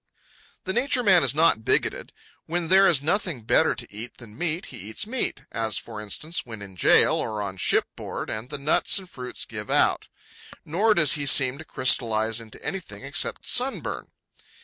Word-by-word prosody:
The 190 Hz, -3 st, -2 dB
Nature 250 Hz, +1 st, +1 dB
Man 190 Hz, -6 st, +5 dB
is 135 Hz, +1 st, +1 dB
not 155 Hz, -8 st, +3 dB
bigoted. -, -, 0 dB, 0.4 s
When 170 Hz, 0 st, -2 dB
there 195 Hz, +1 st, +6 dB
is 140 Hz, -4 st, +2 dB
nothing 170 Hz, -, -1 dB
better -, -, +3 dB
to -, -, -9 dB
eat 115 Hz, +4 st, -7 dB
than 110 Hz, -3 st, -13 dB
meat, 170 Hz, +1 st, -2 dB
he -, -, -7 dB
eats 110 Hz, -, -4 dB
meat, 245 Hz, +3 st, -2 dB
as, 110 Hz, -2 st, -1 dB
for 110 Hz, -2 st, -7 dB
instance, 155 Hz, +11 st, -4 dB
when 110 Hz, -4 st, -9 dB
in 95 Hz, -2 st, -12 dB
jail -, -, +4 dB
or 110 Hz, -1 st, -3 dB
on 95 Hz, -2 st, -5 dB
shipboard -, -, -1 dB
and 110 Hz, +4 st, -5 dB
the 145 Hz, -, -4 dB
nuts 140 Hz, +7 st, +2 dB
and 190 Hz, -2 st, -7 dB
fruits 125 Hz, -7 st, -8 dB
give -, -, -6 dB
out. -, -, +2 dB, 0.6 s
Nor 210 Hz, +8 st, +2 dB
does 155 Hz, -5 st, +5 dB
he 145 Hz, -1 st, -1 dB
seem 135 Hz, 0 st, +5 dB
to -, -, -8 dB
crystallize 115 Hz, -5 st, +1 dB
into 110 Hz, -1 st, -13 dB
anything 160 Hz, -, -6 dB
except 145 Hz, +5 st, -2 dB
sunburn. 255 Hz, +2 st, -1 dB
140 Hz, 180 wpm, -25 LUFS, 110-175 Hz, 0.6 s, there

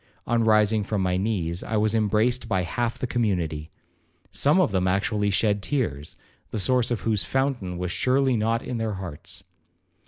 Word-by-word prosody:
On 115 Hz, 0 st, +1 dB
rising 110 Hz, -1 st, +3 dB
from 100 Hz, 0 st, -1 dB
my 90 Hz, -1 st, +1 dB
knees, 90 Hz, -4 st, -1 dB
I 110 Hz, -, -2 dB
was 105 Hz, 0 st, +2 dB
embraced 110 Hz, +3 st, +1 dB
by 95 Hz, -2 st, +1 dB
half 115 Hz, +6 st, -2 dB
the -, -, -2 dB
community. 90 Hz, -11 st, -1 dB, 0.6 s
Some 150 Hz, +6 st, +3 dB
of 180 Hz, -, +3 dB
them 95 Hz, -1 st, +1 dB
actually 105 Hz, +2 st, +1 dB
shed 100 Hz, +1 st, +1 dB
tears, 90 Hz, -, -2 dB, 0.3 s
the -, -, -4 dB
source 125 Hz, +3 st, +2 dB
of 120 Hz, -3 st, -1 dB
whose 105 Hz, -5 st, +1 dB
fountain 120 Hz, -5 st, -1 dB
was 90 Hz, 0 st, -3 dB
surely 130 Hz, 0 st, +2 dB
not 115 Hz, +1 st, 0 dB
in 120 Hz, -, -4 dB
their 110 Hz, -1 st, -1 dB
hearts. 90 Hz, -6 st, -6 dB
110 Hz, 175 wpm, -25 LUFS, 95-120 Hz, 0.6 s, rising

